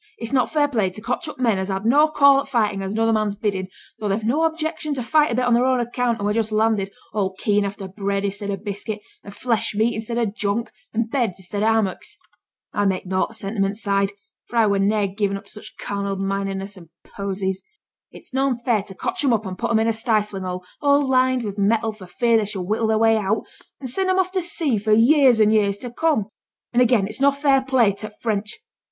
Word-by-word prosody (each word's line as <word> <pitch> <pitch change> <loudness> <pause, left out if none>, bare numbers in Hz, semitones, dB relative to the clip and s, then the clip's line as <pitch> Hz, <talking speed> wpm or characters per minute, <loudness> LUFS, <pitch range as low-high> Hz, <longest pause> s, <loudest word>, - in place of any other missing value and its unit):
It's 230 +3 -6
not 255 -2 +2
fair 295 -2 +3
play 220 -9 0
to 185 - -10
cotch 250 +9 -3
up 305 - -7
men 230 -6 +1
as 190 - -2
has 195 0 -3
no 290 +6 +5
call 280 -2 +5
for - - -17
fightin' 210 -5 +1
at 190 - -3
another 225 +2 +1
man's 215 -2 0
biddin', 195 -3 -2 0.3
though 210 - -2
they've 205 +3 -1
no 285 +9 +2
objection 315 -2 -2
to 255 - -3
fight 300 +2 +3
a - - 0
bit 250 +1 +1
on 245 - +3
their 245 +2 +3
own 260 -1 +2
account 240 0 -1
and - - -9
who 205 - +1
are - - +1
just 220 -1 -1
landed, 215 -2 +1 0.2
all 195 -3 -1
keen 205 0 +1
after 200 0 -5
bread 200 +1 -2
i'stead 200 +1 -3
o' 200 - 0
biscuit, 205 +2 -5 0.2
and 200 - -10
flesh 230 0 -1
meat 225 +3 +1
i'stead 225 +2 -4
o' 235 - +2
junk, 210 +1 -2 0.2
and 225 0 -2
beds 235 -9 0
i'stead 195 +2 -4
o' 215 - +2
hammocks. 215 -4 -1 0.6
(I 205 - +1
make 190 -1 -1
naught 185 0 0
o' - - -14
t' - - -11
sentiment 195 0 -2
side, 200 -2 0 0.4
for - - -10
I 230 -1 +5
were 200 -1 +2
niver 200 -1 +1
gi'en 200 -1 0
up 200 - -12
to - - -15
such 215 - -11
carnal 200 -1 -3
mindedness 195 0 -3
and 170 -3 -14
poesies.) 190 -1 -4 0.5
It's - - -15
noane 265 -2 +1
fair 240 -3 +1
to 195 -1 -12
cotch - - -2
'em 265 -4 +3
up 220 -1 0
and 185 -1 -5
put 235 +5 -3
'em 230 - +3
in 220 +1 +2
a 230 - +2
stifling 215 -3 -1
hole, 180 0 -4 0.2
all 285 -1 +3
lined 255 -1 +2
with 205 -1 -5
metal 220 +2 +2
for 205 -4 -12
fear 230 +5 +2
they 215 - +1
should 195 -2 -4
whittle 215 +4 0
their 220 0 +2
way 225 0 +4
out, 215 +1 0 0.4
and 265 - -6
send 375 +10 -1
'em 375 - +2
off 370 -1 +1
to 375 -1 0
sea 320 - 0
for 215 +1 +1
years 250 +1 +5
an' 215 0 +5
years 205 -2 +2
to 245 +3 -7
come. 300 -5 +1 0.5
And 240 - +4
again 240 -5 +4
it's 215 +6 -7
no 280 - +6
fair 280 -1 +2
play 260 -5 +3
to 210 +2 -7
t' 210 - -25
French. 210 - -2
220 Hz, 245 wpm, -22 LUFS, 200-245 Hz, 0.6 s, no